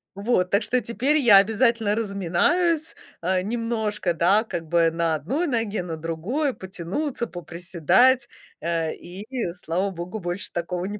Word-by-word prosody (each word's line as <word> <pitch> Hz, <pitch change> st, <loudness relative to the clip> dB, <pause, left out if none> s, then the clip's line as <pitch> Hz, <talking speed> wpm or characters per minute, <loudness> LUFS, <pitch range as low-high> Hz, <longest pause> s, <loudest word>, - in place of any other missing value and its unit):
Вот, 200 Hz, -3 st, +1 dB
так 200 Hz, +2 st, +2 dB
что 250 Hz, +4 st, +2 dB
теперь 240 Hz, +8 st, +1 dB
я 235 Hz, -8 st, +7 dB
обязательно 220 Hz, +1 st, +3 dB
разминаюсь, 230 Hz, -, +1 dB, 0.3 s
а, 185 Hz, +1 st, +1 dB
немножко, 220 Hz, -3 st, -2 dB
да, 185 Hz, +7 st, +3 dB
как 165 Hz, -6 st, -5 dB
бы 170 Hz, 0 st, +3 dB
на 165 Hz, -1 st, 0 dB
одной 270 Hz, -, -2 dB
ноге, 225 Hz, -, -1 dB
на 165 Hz, -2 st, -5 dB
другой 185 Hz, -, -2 dB
потянуться, 195 Hz, -, -4 dB
поприседать, 175 Hz, -, +1 dB, 0.3 s
э, 165 Hz, -1 st, -1 dB
и 185 Hz, +4 st, -10 dB, 0.3 s
слава 180 Hz, +2 st, -2 dB
богу, 180 Hz, +4 st, -6 dB
больше 175 Hz, +1 st, -3 dB
такого 175 Hz, +1 st, -3 dB
не 205 Hz, +1 st, -5 dB
195 Hz, 140 wpm, -24 LUFS, 170-235 Hz, 0.3 s, я